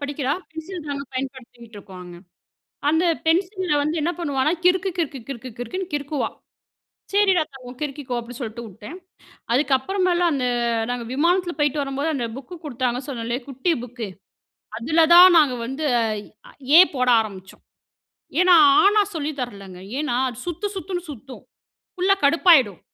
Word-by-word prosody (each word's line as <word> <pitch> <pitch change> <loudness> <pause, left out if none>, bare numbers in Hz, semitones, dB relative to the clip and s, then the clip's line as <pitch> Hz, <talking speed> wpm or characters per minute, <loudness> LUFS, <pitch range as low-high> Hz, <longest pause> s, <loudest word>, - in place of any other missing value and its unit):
படிக்கிறா 285 -1 -2 0.2
பென்சில் 320 +1 -8
தாங்க 280 -1 -4
பயன்படுத்திகிட்டுருக்கோம் 235 -7 -8
அங்க. 175 -1 -11 0.7
அந்த 320 +3 +2 0.2
பென்சில்ல 365 +1 +1
வந்து 305 +3 -1
என்ன 340 +4 0
பண்ணுவான்னா, 285 -2 0
கிறுக்கு, 370 +2 +3
கிறுக்கு, 290 -5 -2
கிறுக்கு, 255 -1 -7
கிறுக்குனு 365 +11 -4
கிறுக்குவா. 290 0 -2 0.8
சரிடா 390 -4 +4
தங்கோம் 250 -1 -11
கிறுக்கிக்கோ 275 -3 -4
அப்டின்னு 235 +1 -8
சொல்லிட்டுவுட்டேன். 230 - -8 0.6
அதுக்கப்புறமேலாம் 345 +7 +1
அந்த 255 -2 -1 0.4
நாங்கள் 240 -2 -4
விமானத்துல 345 +5 +1
போய்ட்டு 295 0 +1
வரும்போது 275 +3 -2
அந்த 245 -3 -2
புக்கு 275 +7 -9
கொடுத்தாங்கன்னு 250 -1 -2
சொன்னேன்ல 235 -2 -3
குட்டி 275 +6 -1
புக்கு. 240 -2 -6 0.7
அதுல 315 +7 +3
தான் 360 0 +9
நாங்க 280 -5 +3
வந்து 270 +5 -4 0.9
A - - +11
போட 255 -1 0
ஆரம்பிச்சோம். 190 -3 -8 0.8
ஏன்னா, 365 -1 +6 0.3
ஆ - - +4
ன்னா 425 -1 +4
சொல்லி 305 -1 -2
தரலங்க. 200 -6 -7 0.2
ஏன்னா 300 -5 -1
அது 245 -1 -8
சுத்து 350 +4 -3
சுத்துனு 365 -2 -4
சுத்தும். 265 0 -11 0.5
புள்ள 375 +2 +2
கடுப்பாயிடும் 280 - +4
280 Hz, 135 wpm, -22 LUFS, 245-340 Hz, 0.9 s, A